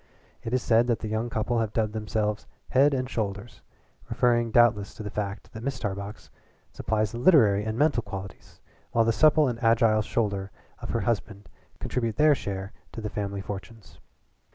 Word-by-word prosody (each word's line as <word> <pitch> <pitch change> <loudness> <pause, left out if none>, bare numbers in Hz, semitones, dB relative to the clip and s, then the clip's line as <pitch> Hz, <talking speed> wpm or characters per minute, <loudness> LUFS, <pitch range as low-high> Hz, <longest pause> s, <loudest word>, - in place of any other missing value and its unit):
It 115 - -5
is 125 -1 0
said 115 +1 +3
that 120 -2 +2
the 110 - -6
young 110 +2 -2
couple 115 +1 -1
have 110 -2 -2
dubbed 110 -1 0
themselves 105 -1 -2 0.2
Head 140 +3 +4
and 130 -2 -1
Shoulders, 110 -1 -4 0.5
referring 120 -1 +2
doubtless 110 -3 +3
to 110 - -7
the 105 - -6
fact 100 0 -5
that 110 - -7
Mrs. 140 +1 -3
Tarbox 100 +1 -5 0.4
supplies 110 -1 -1
the 120 - -6
literary 115 - +5
and 110 +1 -3
mental 145 -3 +2
qualities, 95 -3 -9 0.3
while 115 -1 +3
the 115 - +2
supple 155 +2 +5
and 120 -1 -4
agile 115 -1 +4
shoulder 100 -3 -2 0.3
of - - -8
her - - 0
husband 105 -2 -3 0.3
contribute 115 -4 -2
their 150 +2 +5
share 100 -6 -5 0.2
to - - -6
the 105 -1 -5
family 100 -1 -3
fortunes. 100 +2 -9
110 Hz, 175 wpm, -26 LUFS, 105-120 Hz, 0.5 s, literary